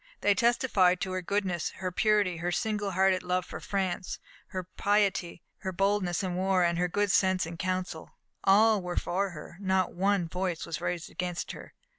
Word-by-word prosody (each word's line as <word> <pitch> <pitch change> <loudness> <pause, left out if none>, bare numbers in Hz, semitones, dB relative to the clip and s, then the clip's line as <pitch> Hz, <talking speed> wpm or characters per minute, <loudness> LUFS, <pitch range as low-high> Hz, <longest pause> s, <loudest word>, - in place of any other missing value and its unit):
They 205 - +4
testified 200 -5 +3
to 190 -1 -2
her 185 0 -2
goodness, 185 -2 -1
her 185 -1 -3
purity, 200 -2 +2
her 175 +2 -2
single 210 +2 -1
hearted 190 0 +3
love 180 0 -1
for - - -7
France, 190 -2 -2 0.3
her 185 -1 -4
piety, 195 -2 0 0.2
her 190 - -3
boldness 195 -1 +1
in 185 -1 -2
war, 185 0 +2
and 170 0 +1
her 180 - +2
good 205 +3 +1
sense 185 -2 +3
in 165 +1 -7
counsel. 185 -2 -3 0.3
All 210 +1 +5
were 180 -1 -5
for 195 +3 0
her 170 -1 -10
not 190 -1 +1
one 195 -1 +1
voice 180 -1 -2
was 165 -2 -5
raised 175 -2 -3
against 180 -1 -3
her. - - -11
185 Hz, 180 wpm, -29 LUFS, 175-200 Hz, 0.3 s, All